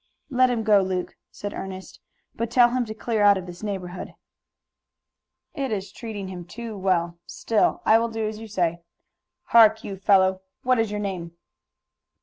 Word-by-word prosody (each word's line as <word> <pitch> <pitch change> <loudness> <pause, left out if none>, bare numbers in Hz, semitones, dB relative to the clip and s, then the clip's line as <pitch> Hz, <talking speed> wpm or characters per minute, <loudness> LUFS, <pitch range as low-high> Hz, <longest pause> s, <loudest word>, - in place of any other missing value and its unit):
"Let 255 0 +4
him 235 -2 -1
go, 210 -2 +5
Luke," 185 -1 -3
said 205 0 -7
Ernest, 190 0 -8 0.3
"but 230 0 -3
tell 240 0 +5
him 250 -1 0
to 215 - -6
clear 220 0 -1
out 205 -1 +6
of 185 - -6
this 175 -1 -10
neighborhood." 190 -4 -5 1.4
"It 275 -5 -3
is 200 -2 -3
treating 215 -4 -6
him 180 -2 -7
too 225 +5 -8
well. 175 -3 0
Still, 225 -2 0
I 225 - +6
will 230 0 -1
do 225 -1 -2
as 215 0 -5
you 225 - -8
say. 175 -5 -1 0.7
Hark, 220 -1 +6
you 195 - -5
fellow, 190 -1 +3 0.2
what 255 -1 +3
is 225 -1 +1
your 210 0 -3
name?" 185 -5 -4
205 Hz, 170 wpm, -24 LUFS, 185-225 Hz, 1.4 s, out